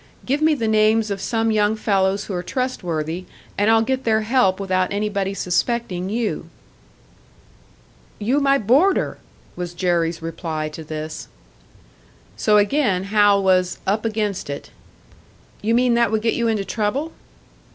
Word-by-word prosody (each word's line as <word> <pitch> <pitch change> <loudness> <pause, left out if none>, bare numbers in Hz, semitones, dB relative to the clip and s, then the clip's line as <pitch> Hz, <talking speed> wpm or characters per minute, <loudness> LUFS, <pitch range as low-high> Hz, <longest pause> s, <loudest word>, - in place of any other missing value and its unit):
"Give 280 +4 0
me 310 0 +4
the 230 -5 -2
names 215 0 +3
of 195 -1 -3
some 225 +1 0
young 210 0 +2
fellows 200 -2 0
who 200 - -6
are 175 - -2
trustworthy, 180 - -3 0.3
and 205 +2 +2
I'll 225 0 +5
get 265 +2 -1
their 220 -1 +2
help 215 -4 +2
without 185 -2 0
anybody 200 -1 -1
suspecting 185 0 -1
you." 225 +1 -2 1.7
"You 240 +7 +1
my 275 -1 +3
boarder!" 275 - +2 0.4
was 175 -1 -5
Jerry's 170 -2 0
reply 160 -2 -4
to 155 +1 -9
this. 155 0 -6 1.1
So 210 - +3
again 205 -3 +2
Hal 205 -2 +5
was 185 -1 +2
"up 210 +3 0
against 210 -6 -2
it." 140 0 -6 0.9
"You 225 +2 +1
mean 245 0 +3
that 235 -2 +2
would 220 0 0
get 230 - +2
you 235 -1 0
into 215 -3 0
trouble?" 235 - -2
210 Hz, 145 wpm, -21 LUFS, 185-230 Hz, 1.7 s, I'll